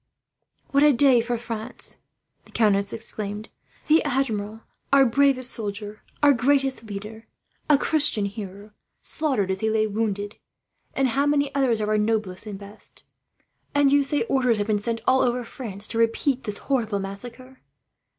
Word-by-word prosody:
"What 280 - +3
a 295 0 +6
day 255 -1 +6
for 240 +1 -2
France!" 230 0 -5 0.5
the - - -18
countess 200 -3 +2
exclaimed. 210 -1 -5 0.4
"The 315 +1 +4
Admiral, 225 -6 -1 0.3
our 275 -1 +6
bravest 255 0 +2
soldier, 210 -1 -5 0.2
our 290 -1 +7
greatest 270 0 +1
leader, 215 +2 -8 0.4
a 295 - +7
Christian 290 -8 +2
hero, 200 0 -7 0.3
slaughtered 260 -12 0
as 190 - -2
he 220 - 0
lay 220 0 +2
wounded! 205 -1 -2 0.6
And 270 -1 +2
how 275 +4 +1
many 285 -1 +1
others 255 -6 +1
of 210 - -1
our 215 0 +2
noblest 210 -2 -1
and 205 -2 -6
best! 200 +1 -10 0.7
And 285 -1 +4
you 285 0 +4
say 285 0 +1
orders 250 -2 +1
have 205 - -1
been 210 -1 0
sent, 230 +1 -3
over 250 -2 +3
all 250 - -4
France, 215 -4 -5
to 230 - -2
repeat 245 +4 +1
this 210 -2 -2
horrible 230 -7 0
massacre? 235 +7 -7
230 Hz, 160 wpm, -24 LUFS, 210-270 Hz, 0.7 s, our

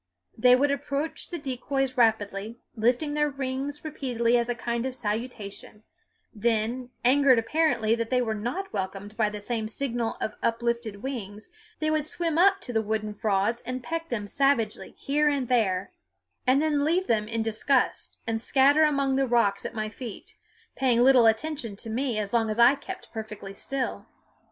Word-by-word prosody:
They 250 +2 +6
would 280 +2 +2
approach 280 +2 -3
the 345 - -4
decoys 270 -2 -2
rapidly, 220 -2 +1 0.2
lifting 245 +6 +1
their 295 0 +2
wings 275 +2 -4
repeatedly 245 -6 0
as 235 0 +2
a 240 - 0
kind 235 +2 -2
of 260 - -5
salutation; 215 -2 -5 0.5
then, 235 +3 -1 0.2
angered 265 0 +5
apparently 235 -3 +2
that 230 -1 -1
they 255 - +2
were 230 -3 0
not 245 - -4
welcomed 195 +1 -4
by 215 -2 +2
the 210 0 -6
same 220 +1 -2
signal 235 -1 -2
of 215 - -2
uplifted 230 -2 -1
wings, 215 -6 -6 0.3
they 310 0 0
would 310 -1 +1
swim 330 0 0
up 390 +1 +5
to 245 - -6
the 220 - +2
wooden 215 0 -2
frauds 210 +3 0
and 255 +1 -5
peck 330 +4 -4
them 215 -4 -2
savagely 235 -2 +1
here 295 +2 +2
and 275 -4 -1
there, 200 -6 +1 0.6
and 270 +4 +4
then 295 -2 +1
leave 345 +5 +2
them 215 - +1
in 225 0 -1
disgust 225 +4 0
and 225 -1 -2
scatter 280 +4 +4
among 275 -3 +2
the 270 -1 +2
rocks 205 -5 +2
at - - -11
my 215 -1 -2
feet, 215 0 -9 0.4
paying 245 -3 +3
little 255 -3 +6
attention 230 -1 0
to 220 +2 -7
me 245 0 -1
as 210 0 -3
long 225 -2 +2
as 215 - -2
I 240 +3 +7
kept 360 +7 -8
perfectly 210 -3 -7
still. 265 +6 -4
240 Hz, 175 wpm, -27 LUFS, 220-275 Hz, 0.6 s, I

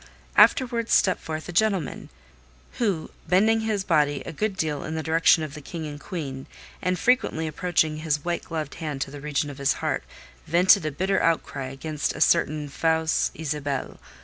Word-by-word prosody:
Afterwards 235 -3 +4
stepped 185 - +3
forth 155 0 -5
a - - -5
gentleman, 195 -3 0 0.7
who, 195 -9 -1 0.2
bending 215 +6 +4
his 215 -3 -1
body 150 -6 +1
a - - -5
good 200 +4 -2
deal 150 -4 -1
in 155 - -4
the 160 - -3
direction 160 0 +4
of 150 -2 -6
the 150 - -8
King 160 +2 -6
and 145 -1 -7
Queen, 140 -6 -6 0.3
and 180 +1 0
frequently 240 -7 +1
approaching 155 -1 0
his 155 -1 -1
white 175 0 -1
gloved 155 -3 -4
hand 150 -3 -3
to 135 - -2
the 145 -1 -9
region 145 0 -1
of 140 - -11
his 140 0 +2
heart, - - -2 0.4
vented 180 +1 +5
a - - -2
bitter 190 +7 0
outcry 150 -4 0
against 145 +3 -3
a - - -6
certain 155 -3 +2
"fausse 160 +2 +1
Isabelle." 145 -3 -3
160 Hz, 175 wpm, -25 LUFS, 150-180 Hz, 0.7 s, vented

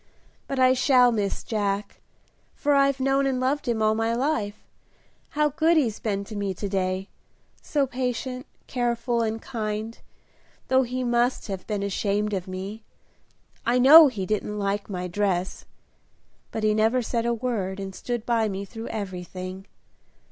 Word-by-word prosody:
But 275 - -3
I 255 0 +5
shall 250 -1 +5
miss 205 -3 -2
Jack, 205 -2 -2 0.5
for 290 -1 +1
I've 275 -1 +3
known 270 +1 +2
and 260 -2 0
loved 270 +2 0
him 225 -2 +1
all 215 0 +4
my 225 +1 0
life. 225 -6 -1 0.7
How 300 0 +4
good 320 +3 +3
he's 235 -8 +1
been 200 -2 -2
to 215 +2 -9
me 200 -2 -2
to 200 - -4
day! 190 0 -1 0.5
so 285 -2 0
patient, 255 +1 -3 0.2
careful, 240 -1 -1
and 225 0 -1
kind, 220 -2 -4 0.7
though 260 0 +5
he 255 0 -2
must 240 +1 +1
have 190 -2 -5
been 205 -2 -2
ashamed 205 +1 -1
of 185 -2 -3
me. 195 +4 -6 0.8
I 240 +2 +2
know 295 +5 +10
he 215 -8 -3
didn't 210 +1 -2
like 200 0 -2
my 180 -2 -3
dress; 185 -1 -1 0.8
but 220 - -4
he 215 0 +3
never 225 +4 +2
said 230 0 -1
a 235 - +2
word 215 -6 -2
and 195 -1 -5
stood 240 +2 -4
by 230 -2 +1
me 195 0 -4
through 225 +2 -8
everything. 185 -2 -6
225 Hz, 160 wpm, -25 LUFS, 200-255 Hz, 0.8 s, know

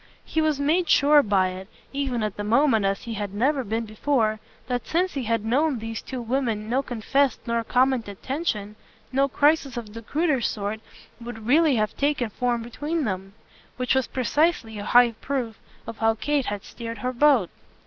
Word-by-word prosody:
He 320 - 0
was 310 -2 +1
made 320 +4 +1
sure 290 +1 +6
by 195 -5 +2
it, 185 +1 -8 0.3
even 265 -5 -1
at 210 -2 -2
the 205 - -4
moment 225 -1 +3
and 195 - +3
as 195 - -13
he 230 - -5
had 205 -2 -4
never 265 +5 +1
been 225 +1 -2
before, 215 0 0 0.3
that 245 -1 -3
since 360 +3 0
he 270 -4 -3
had 230 -1 0
known 275 +4 +2
these 225 0 -5
two 255 -2 -6
women 230 -3 -1
no 250 +4 +1
confessed 265 +2 0
nor 235 -1 0
commented 250 -5 0
tension, 220 -8 -2 0.4
no 275 +1 +2
crisis 285 0 +2
of 215 -3 -6
the 230 - -7
cruder 295 +2 0
sort 210 -1 -2 0.4
would 230 -2 -8
really 295 +3 +4
have 215 -2 0
taken 280 -6 0
form 240 +1 -1
between 295 +7 -3
them: 195 -3 -4 0.4
which 250 -1 +1
was 265 -1 +1
precisely 255 -3 0
a 205 - -5
high 245 -1 +6
proof 235 0 -4 0.3
of 230 - -8
how 225 0 +3
Kate 285 +3 0
had 205 -1 -3
steered 230 -1 -7
her 255 - 0
boat. 255 - +4
240 Hz, 190 wpm, -25 LUFS, 220-280 Hz, 0.4 s, sure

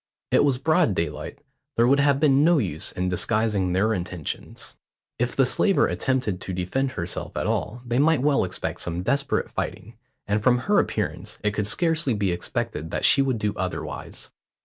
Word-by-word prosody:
It - - +5
was 140 -3 +2
broad 155 - +2
daylight. 75 -3 -3 0.4
There 115 - +5
would 140 +2 +4
have 140 -1 +3
been 140 -2 +4
no 170 +1 +5
use 90 - -2
in 90 0 -2
disguising 100 0 0
their 105 +4 +2
intentions. 90 -4 -5 0.5
If 125 +1 -1
the 135 - +4
slaver 195 +9 +3
attempted 125 -8 -1
to 95 - -5
defend 130 +10 -1
herself 85 -1 -4
at - - -1
all, 120 +2 -2
they 120 +1 0
might 150 -2 +3
well 145 -5 +3
expect 95 0 -4
some 85 +1 -3
desperate 140 +5 0
fighting, - - -5 0.3
and 105 +1 0
from 125 +3 +4
her 205 +12 +2
appearance - - -3
it 105 - +2
could 105 -1 -1
scarcely 160 -2 +1
be 100 -3 0
expected 90 - -3
that - - -1
she 140 - +6
would 130 -3 0
do 105 -1 -1
otherwise. 95 -1 -5
115 Hz, 180 wpm, -24 LUFS, 95-140 Hz, 0.5 s, she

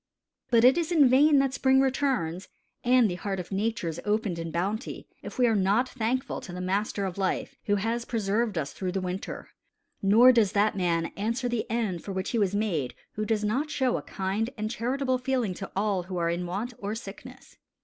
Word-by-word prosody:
But 235 -2 +4
it 260 +6 +6
is 335 0 -2
in 305 -6 +6
vain 285 +4 +5
that 270 -1 +2
spring 265 -1 +3
returns, 260 - 0 0.4
and 250 0 +5
that - - -2
the 175 - -3
heart 195 -2 -2
of 180 - -7
Nature 215 0 -1
is 165 -1 -4
opened 210 -4 0
in 165 0 -4
bounty, 195 +7 -3
if - - -9
we 250 - +4
are 230 - +3
not 205 +6 +2
thankful 255 +2 -2
to 185 - -9
the 180 - -6
Master 195 +2 -1
of 190 0 -5
Life, 190 -1 -1
who 205 - +2
has 225 +4 -1
preserved 220 -2 -1
us 145 -3 -2
through 185 -2 -3
the 195 - 0
winter. 185 +1 -5 0.5
Nor 225 +6 +7
does 225 -6 +3
that 210 +1 +2
man 170 -3 0
answer 230 +5 -1
the 240 -2 -2
end 215 -7 -1
for 195 - -5
which 190 0 -3
he 235 - +1
was 200 -1 +1
made 175 - -1 0.2
who 215 - -3
does 215 -1 0
not 255 +9 0
show 260 -4 +1
a - - -2
kind 200 +4 -2
and 215 0 -2
charitable 255 +2 -1
feeling 250 -6 0
to 195 +2 -7
all 200 -1 +1
who 180 +1 -6
are 170 -1 +1
in 175 +1 -2
want 210 +8 -3
or 205 +2 -3
sickness. 245 +5 -10
215 Hz, 215 wpm, -27 LUFS, 190-245 Hz, 0.5 s, Nor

